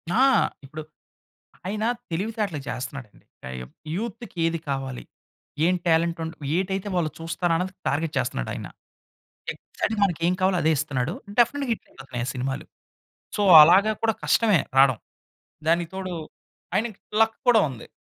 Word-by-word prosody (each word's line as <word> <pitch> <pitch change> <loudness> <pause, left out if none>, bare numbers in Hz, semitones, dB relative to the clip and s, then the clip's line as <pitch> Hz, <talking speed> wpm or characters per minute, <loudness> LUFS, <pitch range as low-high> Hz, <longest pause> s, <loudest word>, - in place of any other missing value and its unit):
ఆ! - - +3 0.5
ఇప్పుడు 155 +3 -7 0.9
ఆయన 210 +2 -2 0.3
తెలివితేటలు‌గా 200 -3 -2
చేస్తున్నాడండి. 130 -3 -7 0.2
ఆహ్, 65 -1 -6 0.3
యూత్‌కి 220 -1 -6
ఏది 165 0 0
కావాలి? 135 -2 -3 0.6
ఏం 180 +2 +3
టాలెంట్ 165 0 +2
ఉండ్ 160 0 -5 0.2
ఏటైతే 190 +1 -2
వాళ్ళు 170 -3 +1
చూస్తారో 165 +1 -1
అన్నది 180 +2 -2
టార్గెట్ 155 +2 -1
చేస్తున్నాడు - - -1
ఆయన. - - -6 0.9
ఎక్సాక్ట్‌గా 215 -1 -4
మనకేం 175 -1 +1
కావాలో 185 -1 +3
అదే 160 - +4
ఇస్తున్నాడు. 145 -1 -1 0.3
డెఫినిట్‌గా 255 +3 +3
హిటయిపోతున్నాయి 125 - -6
ఆ - - -3
సినిమాలు. 130 +1 -3 0.7
సో - - +1 0.2
అలాగా 190 +7 +6
కూడా 225 -1 +2
కష్టమే 215 -7 +4 0.2
రాడం. 135 -3 +6 0.7
దానికి 170 0 +2
తోడు 190 -1 -4 0.6
ఆయనకి 220 -2 -1 0.2
లక్ 225 0 +3
కూడా 240 -2 +7
ఉంది. 125 -4 -9
170 Hz, 130 wpm, -25 LUFS, 145-205 Hz, 0.9 s, కూడా